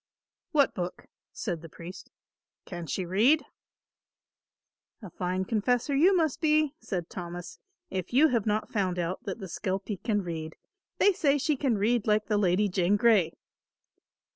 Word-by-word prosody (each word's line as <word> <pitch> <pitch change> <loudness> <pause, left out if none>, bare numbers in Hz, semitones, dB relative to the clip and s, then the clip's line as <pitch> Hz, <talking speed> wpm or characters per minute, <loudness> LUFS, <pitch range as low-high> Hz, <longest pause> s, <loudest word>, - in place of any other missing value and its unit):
"What 285 -3 +3
book?" 180 -1 -5 0.3
said 175 -7 -4
the 165 - -10
priest. 170 +4 -10 0.6
"Can 175 -3 -7
she 185 +5 -2
read?" 225 - +3 1.6
"A 190 - -8
fine 185 +2 -2
confessor 245 +6 0
you 365 +7 +5
must 315 -5 0
be," 305 -2 +3
said 180 - -4
Thomas, 175 -1 -7 0.3
"if 185 -1 -3
you 290 +6 +5
have 230 -5 0
not 215 +1 0
found 185 -4 0
out 175 +1 -2
that 195 - -4
the 200 - -7
skelpie 190 +4 -3
can 210 -4 0
read. 160 -2 -5 0.4
They 405 - +5
say 290 -5 +2
she 290 +2 +1
can 255 -5 0
read 220 +2 +1
like 210 0 +3
the 210 -2 +1
Lady 195 +1 +3
Jane 185 +1 +2
Grey." 210 -6 +4
205 Hz, 155 wpm, -28 LUFS, 180-250 Hz, 1.6 s, you